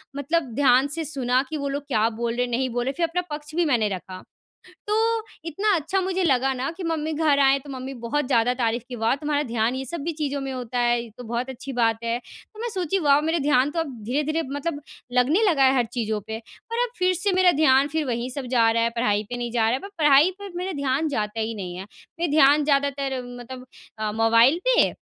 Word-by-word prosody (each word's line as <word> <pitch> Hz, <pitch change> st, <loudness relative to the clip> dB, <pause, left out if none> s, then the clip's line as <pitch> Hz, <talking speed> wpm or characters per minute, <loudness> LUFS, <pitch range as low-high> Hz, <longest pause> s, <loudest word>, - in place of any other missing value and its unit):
मतलब 285 Hz, -2 st, -1 dB
ध्यान 265 Hz, -1 st, +4 dB
से 330 Hz, -, -2 dB
सुना 255 Hz, -3 st, +1 dB
कि 315 Hz, -, -3 dB
वो 280 Hz, -1 st, -3 dB
लोग 280 Hz, +1 st, -3 dB
क्या 225 Hz, -4 st, +2 dB
बोल 230 Hz, +1 st, -3 dB
रहे 245 Hz, +1 st, +1 dB
हैं 245 Hz, -, -7 dB
नहीं 255 Hz, +2 st, 0 dB
बोल 245 Hz, 0 st, -2 dB
रहे 270 Hz, -, -1 dB
फ़िर 340 Hz, -1 st, +1 dB
अपना 360 Hz, +2 st, -1 dB
पक्ष 300 Hz, +1 st, -10 dB
भी 345 Hz, -, +2 dB
मैंने 235 Hz, -8 st, +2 dB
रखा। 185 Hz, 0 st, -9 dB, 0.7 s
तो 420 Hz, -, 0 dB, 0.5 s
इतना 390 Hz, +5 st, +1 dB
अच्छा 345 Hz, +5 st, -1 dB
मुझे 375 Hz, 0 st, -1 dB
लगा 270 Hz, -3 st, +2 dB
ना 260 Hz, +3 st, -2 dB
कि 380 Hz, -, -7 dB
मम्मी 320 Hz, -1 st, -2 dB
घर 300 Hz, -2 st, +2 dB
आएँ 270 Hz, 0 st, +5 dB
तो 280 Hz, -, -12 dB
मम्मी 260 Hz, 0 st, -6 dB
बहुत 245 Hz, +4 st, -2 dB
ज़्यादा 245 Hz, -1 st, +2 dB
तारीफ़ 235 Hz, -1 st, -1 dB
कि 250 Hz, -, -6 dB
"वाह, 225 Hz, +2 st, +1 dB
तुम्हारा 295 Hz, 0 st, -1 dB
ध्यान 235 Hz, -2 st, -1 dB
ये 265 Hz, -, -4 dB
सब 340 Hz, +6 st, -5 dB
भी 335 Hz, -, -1 dB
चीज़ों 285 Hz, -2 st, -3 dB
में 270 Hz, 0 st, -4 dB
होता 250 Hz, -1 st, -4 dB
है 240 Hz, 0 st, +2 dB
ये 235 Hz, -, -11 dB
तो 245 Hz, -, -8 dB
बहुत 235 Hz, +3 st, -3 dB
अच्छी 260 Hz, +2 st, -7 dB
बात 230 Hz, -2 st, +1 dB
है।" 230 Hz, +1 st, 0 dB
तो 430 Hz, -, -16 dB
मैं 475 Hz, -, -2 dB
सोची 370 Hz, 0 st, 0 dB
वाह 290 Hz, -2 st, +4 dB
मेरा 320 Hz, +2 st, 0 dB
ध्यान 285 Hz, -2 st, +2 dB
तो 330 Hz, +2 st, -2 dB
अब 285 Hz, -5 st, -4 dB
धीरे-धीरे 300 Hz, +7 st, -1 dB
मतलब 290 Hz, +1 st, -3 dB, 0.3 s
लगने 265 Hz, -, +3 dB
लगा 280 Hz, -5 st, +3 dB
है 265 Hz, 0 st, +4 dB
हर 245 Hz, -2 st, +2 dB
चीज़ों 220 Hz, -3 st, -2 dB
पे 220 Hz, 0 st, -4 dB
और 455 Hz, -, -9 dB
अब -, -, -15 dB
फ़िर 365 Hz, 0 st, +2 dB
से 375 Hz, +3 st, 0 dB
मेरा 365 Hz, -1 st, +5 dB
ध्यान 270 Hz, 0 st, +5 dB
फ़िर 315 Hz, +1 st, -1 dB
वही 240 Hz, 0 st, -2 dB
सब 265 Hz, 0 st, -5 dB
जा 225 Hz, -1 st, +5 dB
रहा 230 Hz, 0 st, +1 dB
है 230 Hz, -, +1 dB
पढ़ाई 210 Hz, -3 st, +1 dB
पे 245 Hz, -, -3 dB
नहीं 240 Hz, -1 st, -4 dB
जा 235 Hz, -2 st, +1 dB
रहा -, -, +1 dB
है, 255 Hz, -, +1 dB
पर 395 Hz, -, -9 dB
पढ़ाई 295 Hz, +3 st, +6 dB
पर 400 Hz, -2 st, -8 dB
मेरा 370 Hz, +2 st, -3 dB
ध्यान 280 Hz, 0 st, 0 dB
जाता 215 Hz, -5 st, -2 dB
ही 225 Hz, +1 st, -2 dB
नहीं 185 Hz, -4 st, -6 dB
है। 185 Hz, -, -6 dB, 0.4 s
मेरा 340 Hz, -3 st, 0 dB
ध्यान 295 Hz, 0 st, +5 dB
ज़्यादातर 275 Hz, -2 st, 0 dB, 0.2 s
मतलब 250 Hz, +1 st, -9 dB, 0.3 s
अ, 215 Hz, -1 st, -2 dB
मोबाइल 230 Hz, +7 st, +4 dB
पे -, -, +4 dB
270 Hz, 245 wpm, -24 LUFS, 240-310 Hz, 0.7 s, पढ़ाई